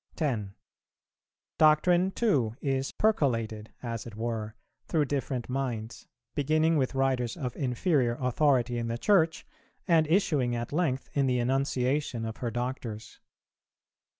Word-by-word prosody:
10. 110 Hz, -11 st, -2 dB, 1.0 s
Doctrine 175 Hz, +4 st, +5 dB
too 140 Hz, -, +1 dB
is 135 Hz, -1 st, -1 dB
percolated, 115 Hz, -, 0 dB
as 115 Hz, -1 st, -4 dB
it 110 Hz, -, -9 dB
were, 110 Hz, -1 st, -3 dB, 0.3 s
through 155 Hz, -3 st, +2 dB
different 135 Hz, -3 st, -2 dB
minds, 120 Hz, -4 st, -4 dB, 0.3 s
beginning 155 Hz, +3 st, +2 dB
with 135 Hz, -3 st, 0 dB
writers 130 Hz, -3 st, 0 dB
of 125 Hz, -4 st, -4 dB
inferior 125 Hz, -2 st, +1 dB
authority 125 Hz, -2 st, +2 dB
in 115 Hz, -, -2 dB
the 115 Hz, 0 st, -2 dB
Church, 165 Hz, -, +2 dB, 0.4 s
and 160 Hz, -3 st, +4 dB
issuing 150 Hz, -8 st, +2 dB
at 120 Hz, +3 st, -4 dB
length 150 Hz, -6 st, 0 dB
in 140 Hz, -2 st, +2 dB
the 125 Hz, -1 st, +2 dB
enunciation 130 Hz, 0 st, 0 dB
of 110 Hz, -1 st, -5 dB
her 120 Hz, -, -2 dB
Doctors. 120 Hz, -2 st, -5 dB
130 Hz, 125 wpm, -29 LUFS, 120-150 Hz, 1.0 s, Doctrine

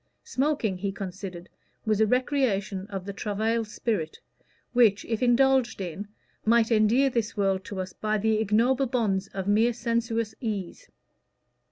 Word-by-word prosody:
Smoking, 255 Hz, -9 st, -1 dB
he 200 Hz, +1 st, -2 dB
considered, 185 Hz, -2 st, -7 dB, 0.4 s
was 215 Hz, -1 st, +2 dB
a 220 Hz, -, +4 dB
recreation 215 Hz, -7 st, 0 dB
of 195 Hz, -3 st, -6 dB
the 200 Hz, -, -5 dB
travailled 220 Hz, +3 st, -1 dB
spirit, 210 Hz, -7 st, -3 dB, 0.5 s
which, 225 Hz, -5 st, +4 dB
if 225 Hz, 0 st, -2 dB
indulged 255 Hz, 0 st, +3 dB
in, 190 Hz, +2 st, -5 dB, 0.4 s
might 230 Hz, +1 st, +3 dB
endear 230 Hz, +5 st, +4 dB
this 230 Hz, -4 st, -2 dB
world 195 Hz, -2 st, +1 dB
to 200 Hz, -, -6 dB
us 185 Hz, -1 st, -4 dB
by 215 Hz, 0 st, -1 dB
the 215 Hz, +1 st, +1 dB
ignoble 235 Hz, +6 st, +2 dB
bonds 210 Hz, -6 st, 0 dB
of 190 Hz, -1 st, -5 dB
mere 220 Hz, +4 st, +3 dB
sensuous 230 Hz, -1 st, -1 dB
ease. 205 Hz, -7 st, -4 dB
215 Hz, 145 wpm, -27 LUFS, 195-235 Hz, 0.5 s, a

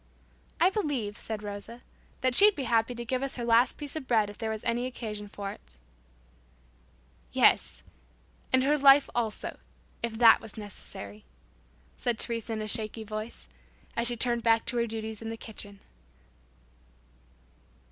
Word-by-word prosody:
"I 360 Hz, +3 st, +5 dB
believe," 280 Hz, -, -2 dB
said 215 Hz, 0 st, -5 dB
Rosa, 205 Hz, +4 st, -6 dB, 0.4 s
"that 255 Hz, -1 st, +2 dB
she'd 415 Hz, +7 st, +7 dB
be 280 Hz, -, -3 dB
happy 230 Hz, 0 st, +1 dB
to 240 Hz, 0 st, -5 dB
give 255 Hz, +2 st, -1 dB
us 275 Hz, -1 st, -2 dB
her 240 Hz, -, -4 dB
last 235 Hz, +2 st, +4 dB
piece 290 Hz, -1 st, -5 dB
of 295 Hz, -5 st, -5 dB
bread 215 Hz, -4 st, +2 dB
if 205 Hz, -, -15 dB
there 225 Hz, -1 st, -2 dB
was 220 Hz, -1 st, -4 dB
occasion 235 Hz, -3 st, -3 dB
for 200 Hz, -1 st, -6 dB
it" -, -, -10 dB, 1.5 s
"Yes, -, -, +3 dB, 0.7 s
and 260 Hz, 0 st, +5 dB
her 295 Hz, +2 st, +3 dB
life 275 Hz, 0 st, +7 dB
also, 225 Hz, -3 st, -2 dB, 0.4 s
if 235 Hz, -1 st, -2 dB
that 230 Hz, -1 st, +7 dB
was 225 Hz, -1 st, -10 dB
necessary," 105 Hz, -, -8 dB, 0.7 s
said 240 Hz, -2 st, -1 dB
Teresa 230 Hz, 0 st, -2 dB
in 215 Hz, -1 st, -3 dB
a -, -, -4 dB
shaky 220 Hz, 0 st, 0 dB
voice, 215 Hz, +2 st, -6 dB, 0.5 s
as 235 Hz, 0 st, +1 dB
she 240 Hz, 0 st, -2 dB
turned 235 Hz, 0 st, +1 dB
back 225 Hz, -1 st, +3 dB
to 245 Hz, -, -1 dB
her 235 Hz, 0 st, +1 dB
duties 220 Hz, -1 st, -5 dB
in 225 Hz, -, -5 dB
the 225 Hz, -, -5 dB
kitchen. 205 Hz, -3 st, -8 dB
230 Hz, 155 wpm, -29 LUFS, 215-245 Hz, 1.5 s, she'd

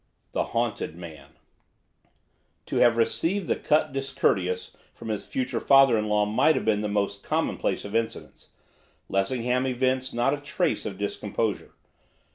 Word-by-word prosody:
THE -, -, 0 dB
HAUNTED 80 Hz, -, -2 dB
MAN 85 Hz, -3 st, -11 dB, 1.3 s
To -, -, -3 dB
have 120 Hz, -1 st, +5 dB
received 170 Hz, -, 0 dB
the -, -, +2 dB
cut 150 Hz, -1 st, +1 dB
discourteous 95 Hz, -9 st, -1 dB, 0.2 s
from 115 Hz, -, -8 dB
his 105 Hz, -2 st, -3 dB
future 130 Hz, -1 st, -2 dB
father 135 Hz, -3 st, +6 dB
in 105 Hz, -1 st, 0 dB
law 105 Hz, 0 st, +3 dB
might 110 Hz, +9 st, +3 dB
have -, -, -2 dB
been 105 Hz, -2 st, +2 dB
the 105 Hz, -, -1 dB
most 100 Hz, -1 st, -1 dB
commonplace -, -, -1 dB
of 100 Hz, +2 st, -6 dB
incidents, 115 Hz, 0 st, -3 dB, 0.6 s
Lessingham 125 Hz, +6 st, 0 dB
evinced 130 Hz, 0 st, 0 dB
not 120 Hz, +4 st, +2 dB
a -, -, -1 dB
trace 155 Hz, +3 st, -1 dB
of 95 Hz, -, -6 dB
discomposure. 105 Hz, +1 st, -3 dB
115 Hz, 145 wpm, -26 LUFS, 105-130 Hz, 1.3 s, father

